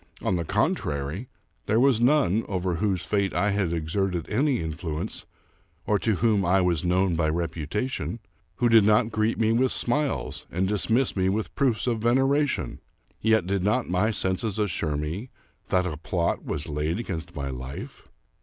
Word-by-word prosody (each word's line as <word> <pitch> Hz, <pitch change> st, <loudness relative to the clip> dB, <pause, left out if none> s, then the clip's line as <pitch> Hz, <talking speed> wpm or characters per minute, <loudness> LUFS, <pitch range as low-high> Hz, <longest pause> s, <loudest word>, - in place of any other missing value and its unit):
On 95 Hz, -, +1 dB
the 85 Hz, -, -1 dB
con -, -, +2 dB
trary, 75 Hz, -, -4 dB, 0.4 s
there 110 Hz, -, +3 dB
was 130 Hz, -3 st, +4 dB
none, 120 Hz, -, +3 dB
over 95 Hz, -2 st, -1 dB
whose 95 Hz, -3 st, 0 dB
fate 100 Hz, -2 st, 0 dB
I 100 Hz, +4 st, +2 dB
had 100 Hz, -4 st, 0 dB
exerted 85 Hz, +1 st, -1 dB
any 135 Hz, +4 st, +2 dB
influence 80 Hz, 0 st, -5 dB, 0.6 s
or 105 Hz, -1 st, +2 dB
to 110 Hz, -3 st, +1 dB
whom 105 Hz, -1 st, +2 dB
I 95 Hz, +2 st, +3 dB
was 90 Hz, -4 st, +1 dB
known 90 Hz, 0 st, +2 dB
by 80 Hz, -1 st, +1 dB
reputation, 85 Hz, -, -2 dB, 0.4 s
who 120 Hz, -, +2 dB
did 115 Hz, -2 st, +6 dB
not 110 Hz, +2 st, +3 dB
greet 110 Hz, +1 st, 0 dB
me 110 Hz, -1 st, +2 dB
with 125 Hz, +3 st, +2 dB
smiles 145 Hz, +4 st, -2 dB
and 95 Hz, +2 st, 0 dB
dismiss 110 Hz, +5 st, +1 dB
me 95 Hz, -1 st, +2 dB
with 105 Hz, +3 st, -2 dB
proofs 130 Hz, -6 st, +1 dB
of 120 Hz, -3 st, 0 dB
veneration: 135 Hz, +5 st, +1 dB, 0.4 s
yet 110 Hz, -4 st, +3 dB
did 95 Hz, 0 st, -1 dB
not 105 Hz, +3 st, +1 dB
my 90 Hz, +5 st, +2 dB
senses 100 Hz, 0 st, -1 dB
assure 85 Hz, -7 st, -1 dB
me 85 Hz, -, -4 dB, 0.4 s
that 90 Hz, 0 st, +2 dB
a 80 Hz, -5 st, -3 dB
plot 85 Hz, +2 st, -1 dB
was 75 Hz, -, -4 dB
laid 75 Hz, +3 st, -1 dB
against 90 Hz, -9 st, -5 dB
my 70 Hz, -1 st, -3 dB
Hfe? 65 Hz, +2 st, -7 dB
95 Hz, 170 wpm, -26 LUFS, 85-115 Hz, 0.6 s, did